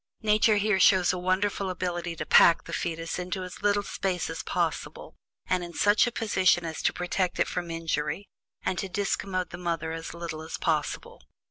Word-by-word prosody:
Nature 215 0 +4
here 205 -1 +2
shows 185 -1 +5
a - - -2
wonderful 190 +2 0
ability 175 -1 -3
to 150 - -4
pack 170 - +6
the - - -9
fetus 165 +1 -3
into 185 +1 -3
as 180 -1 -9
little 205 0 +2
space 190 -2 -2
as - - -4
possible, - - -3 0.3
and 185 -1 0
in 175 0 -8
such 205 +3 +4
a - - -1
position 190 -6 +2
as 160 -1 -4
to - - +2
protect 180 0 -2
it - - +3
from 175 -1 -4
injury, 165 +2 -2 0.4
and 180 - -1
to 195 - -3
discommode 190 -2 -2
the 175 - -7
mother 165 -2 -2
as 165 0 -6
little 170 -2 -5
as 160 - -6
possible. 155 - -2
180 Hz, 190 wpm, -27 LUFS, 165-195 Hz, 0.4 s, pack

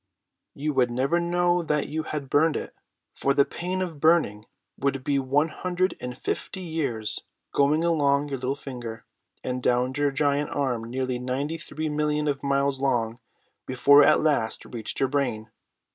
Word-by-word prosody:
"You 150 +2 -2
would 125 -2 +3
never 135 +8 +1
know 175 +1 +2
that 150 -3 0
you 160 +1 -2
had 150 -3 -5
burned 150 +3 +3
it, - - -6 0.4
for 140 0 0
the 140 - +5
pain 185 +2 -3
of 165 -5 -6
burning 150 -10 +2 0.3
would 135 -1 -1
be 140 0 +1
one 140 +4 +1
hundred 185 +3 -1
and 125 0 -5
fifty 190 - -4
years 140 -11 -2 0.3
going 145 +3 +3
along 145 -4 +2
your 135 -2 -3
little 130 +2 -1
finger, 120 -5 -7 0.4
and 125 0 -3
down 125 +1 +1
your 145 0 +2
giant 145 +1 +1
arm 125 -5 -1
nearly 125 +1 -2
ninety 135 +6 -2
three 155 -1 -4
millions 150 0 0
of 140 -1 -2
miles 140 -1 +1
long, 120 -4 0 0.5
before 140 +3 +6
it - - +6
at 155 - +5
last 140 -8 0
reached 115 -3 -6
your 135 - +3
brain. 125 -6 -1
140 Hz, 170 wpm, -26 LUFS, 130-155 Hz, 0.5 s, before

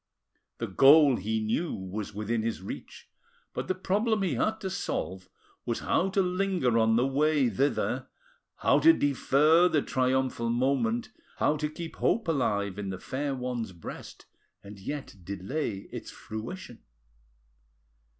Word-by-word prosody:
The - - -2
goal, 140 -1 +6
he 110 +4 -1
knew, 115 +10 -1
was 95 +2 -5
within 105 +2 -2
his 115 0 -2
reach, - - -8 0.5
but - - -4
the 185 - 0
problem 205 +3 0
he 180 -7 0
had 215 - 0
to 190 - -3
solve 95 - -4 0.3
was 120 -2 -2
how 190 - +1
to 195 0 +2
linger 180 -10 +1
on 110 0 +3
the 120 +2 +3
way 140 -1 +2
thither, 140 +8 0 0.5
how - - +3
to 330 - +7
defer 150 - +4
the 155 -4 +2
triumphal 130 -2 0
moment, 120 -1 +1 0.3
how 150 - +2
to 150 0 -2
keep 165 +1 -8
hope 225 -4 +1
alive 105 - 0
in 100 -1 -4
the 95 - -4
fair 135 +7 -3
one's 125 -5 -4
breast 85 - -9 0.4
and 100 0 -11
yet 140 +1 -6
delay 100 - -4
its - - -7
fruition. 120 +5 -8
130 Hz, 145 wpm, -28 LUFS, 110-160 Hz, 0.5 s, to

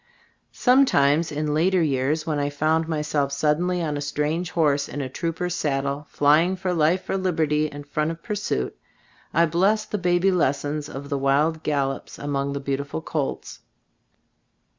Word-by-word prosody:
Some 260 +2 +5
times, 145 - +2
in 150 0 -1
later 175 +3 +3
years, 145 +2 0
when 155 -2 -1
I 145 0 0
found 155 +3 +1
myself 150 -3 -1
suddenly 165 +5 +1
on 150 -2 -2
a - - -4
strange 150 +4 -1
horse 145 -4 +1
in 145 - -5
a 135 - -2
trooper's 170 +5 -3
saddle, 140 -2 -2
flying 155 +6 +3
for 185 -1 -2
life 170 +3 +1
or - - 0
liberty 155 -5 +1
in 145 -1 -9
front 150 +2 -1
of 165 0 -7
pursuit, 200 - -2 0.6
I 170 +1 +4
blessed 200 +7 +1
the 210 - -1
baby 180 +1 +2
lessons 145 -2 0
of 140 +1 -7
the 140 - -1
wild 150 +4 +2
gallops 140 -3 -2
among 140 -1 -2
the 140 - -3
beautiful 140 +3 -3
colts. 150 -5 -4
150 Hz, 160 wpm, -24 LUFS, 145-170 Hz, 0.6 s, Some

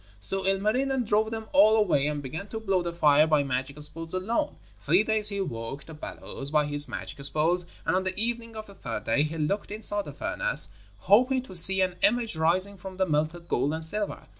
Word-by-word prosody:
So 190 - +4
Ilmarinen 245 +7 0
drove 215 +1 +1
them 220 0 -6
all 220 -7 +6
away 175 -10 +2
and 150 -1 -3
began 160 +10 -7
to 220 - -6
blow 195 -4 0
the 170 0 -4
fire 150 -2 +4
by 150 -2 +2
magic 135 +2 -4
spells 165 +3 -6
alone. 185 - -2 0.3
Three 170 - +2
days 215 -1 +1
he 200 -1 -3
worked 120 -3 -6
the 160 - -11
bellows 140 -2 -7
by 150 0 +1
his 145 0 +2
magic 145 -1 -7
spells, 165 +5 +1 0.2
and 165 - +1
on 185 - 0
the 185 +1 -4
evening 230 0 -3
of 215 0 -7
the 200 - -15
third 115 - -6
day 115 +6 +1
he 155 +2 -3
looked 160 +7 -2
inside 205 -1 0
the - - -8
furnace, - - 0 0.3
hoping 255 +5 +3
to 190 - -10
see 190 +3 +8
an 185 -1 -1
image 225 0 +1
rising 185 +5 +2
from 185 0 -10
the 190 - +1
melted 160 +2 -2
gold 140 +5 -1
and 160 0 -1
silver. 205 +5 -1
185 Hz, 215 wpm, -26 LUFS, 150-210 Hz, 0.3 s, see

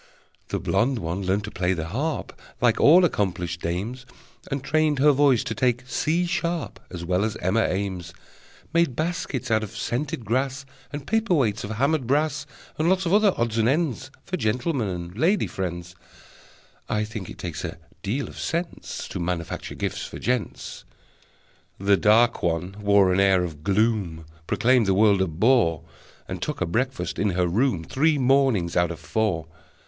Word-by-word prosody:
The - - -2
blonde 125 +3 +1
one 85 -1 -3
learned 95 +2 0
to 105 - -6
play 90 0 0
the 80 -1 -4
harp, 140 - -2 0.3
Like - - +3
all 175 +5 +7
accomplished 90 - -1
dames, 110 +9 -3 0.4
And 135 -1 -3
trained 155 0 +2
her 145 +2 +6
voice 140 -4 +4
to - - -3
take 125 +1 0
C 160 +7 0
sharp 170 -2 -2
As 85 -1 -6
well 90 +2 +1
as 110 0 -1
Emma 105 +5 +1
Eames; 95 -3 -3 0.6
Made 170 -7 +2
baskets 150 -5 -2
out 110 0 +3
of 110 +1 -7
scented 120 +1 -3
grass, 135 +4 -1 0.3
And 145 -1 -6
paper 225 -2 +1
weights 110 -8 +1
of 105 - -5
hammered 135 +4 0
brass, 150 +1 0 0.3
And 160 +2 +3
lots 190 0 +2
of 170 - +1
other 210 -1 +5
odds 115 -1 0
and 115 +1 +3
ends 140 -3 0 0.2
For 185 - -3
gentleman 125 - 0
and 90 -1 -5
lady 175 - +2
friends. 90 -2 -5 1.0
(I 105 0 +1
think 105 -3 -6
it - - -9
takes 85 -5 -5
a - - -5 0.2
deal 130 +8 -2
of - - -10
sense 170 +1 -4
To - - -5
manufacture 85 -1 -3
gifts - - -3
for - - -7
gents!) 125 -2 -3 0.9
The 100 +1 +3
dark 110 +4 +4
one 85 +3 -1
wore 100 -2 +4
an 95 - +2
air 95 -2 +4
of 75 -4 -6
gloom, 100 -5 0 0.2
Proclaimed 125 -3 +3
the 95 - +3
world 100 -1 +4
a 95 - +2
bore, 85 0 +2 0.4
And - - -5
took - - -3
her - - +1
breakfast 125 +10 -2
in 105 - +2
her 90 - +3
room 95 0 +1
Three 150 - +2
mornings 130 -9 +2
out 85 -1 +3
of 85 - -6
four. 100 -8 -1
115 Hz, 175 wpm, -24 LUFS, 95-140 Hz, 1.0 s, all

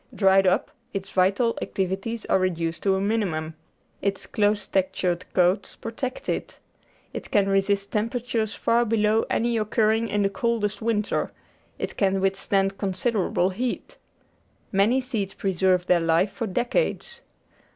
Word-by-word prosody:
Dried 195 -1 +4
up, 185 +10 +1 0.2
its 195 0 -4
vital 200 +6 +2
activities 195 +4 -3
are - - +2
reduced 170 -3 -1
to 195 -1 +2
a - - 0
minimum; 190 -7 -1 0.5
its 195 -1 -1
close 210 0 +1
textured 185 -2 -1
coats 185 +2 +2
protect 250 +3 -5
it; - - -3 0.6
it - - -6
can 200 -1 +3
resist 195 +1 +1
temperatures 225 0 -1
far 235 +1 +2
below 220 -1 +2
any 235 0 +1
occurring 220 +1 +1
in 205 -1 0
the 195 - +2
coldest 230 -5 -1
winter; 220 -2 0 0.5
it - - -5
can 195 -1 +2
withstand 195 0 0
con 195 -2 -1
siderable 190 -3 0
heat; 245 +5 -4 0.7
many 215 +7 +3
seeds 220 -7 -3
preserve 185 -1 +1
their 180 -1 +4
life 165 +4 +2
for 200 +3 -4
decades. 245 - -1
200 Hz, 140 wpm, -25 LUFS, 190-225 Hz, 0.7 s, Dried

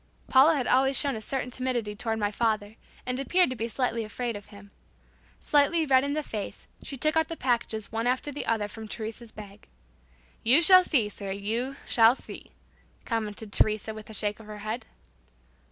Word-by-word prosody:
Paula 280 +5 +6
had 265 -4 -1
always 270 +1 +3
shown 280 -4 +1
a 220 - -6
certain 250 +2 -3
timidity 245 -5 -2
toward 225 +1 -2
my 205 -1 -1
father, 215 -1 -1 0.3
and 250 +1 -2
appeared 350 +3 +2
to - - -3
be 230 -1 -3
slightly 235 0 -1
afraid 230 +2 -4
of 205 -1 -9
him. 205 -1 -15 0.7
Slightly 300 +3 +2
red 260 -2 +4
in 285 +1 -1
the 305 - -1
face, 215 -7 -6
she 275 - -7
took 305 +5 +1
out 320 -1 +2
the 330 - -6
packages 235 -4 -1
one 225 +2 -1
after 260 +3 0
the 290 - -5
other 220 -2 0
from 220 +1 -9
Teresa's 220 +1 -6
bag. 205 -1 -12 0.7
"You 250 +7 +6
shall 370 +2 +9
see, 255 -12 +1
sir. 200 -1 -8
You 225 +7 -2
shall 230 +1 +5
see," - - -10 0.6
commented 220 -2 -4
Teresa, 215 0 +1
with 215 0 -11
a - - -9
shake 210 +1 -1
of 220 - -13
her 210 0 -8
head. 220 +2 -4
230 Hz, 190 wpm, -27 LUFS, 215-265 Hz, 0.7 s, shall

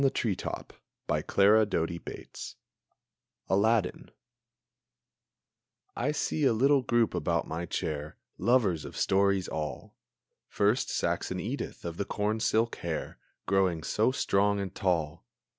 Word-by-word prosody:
ALADDIN 135 0 +3 0.2
Versified - - -6 0.3
by - - 0
Clara 105 +3 +5
Doty 85 -4 -1
Bates - - -8 1.0
I 105 +3 +4 2.4
see 150 0 -1
a 135 - +5
little 135 +4 +4
group 120 -2 +2
about - - 0
my 85 +2 -4
chair, 75 0 -3 0.2
Lovers 100 -7 +2
of - - -8
stories 100 -1 +2
all! 75 -1 -5 0.5
First, 105 +5 +1
Saxon - - -1
Edith, - - -5
of 85 -1 -4
the 100 - -1
corn 105 +1 -1
silk 115 0 +1
hair, 85 -2 -4 0.3
Growing 95 -5 +1
so 110 +8 +2
strong 100 -5 +2
and 95 -1 -4
tall! 80 -5 -1
100 Hz, 120 wpm, -29 LUFS, 85-110 Hz, 2.4 s, Clara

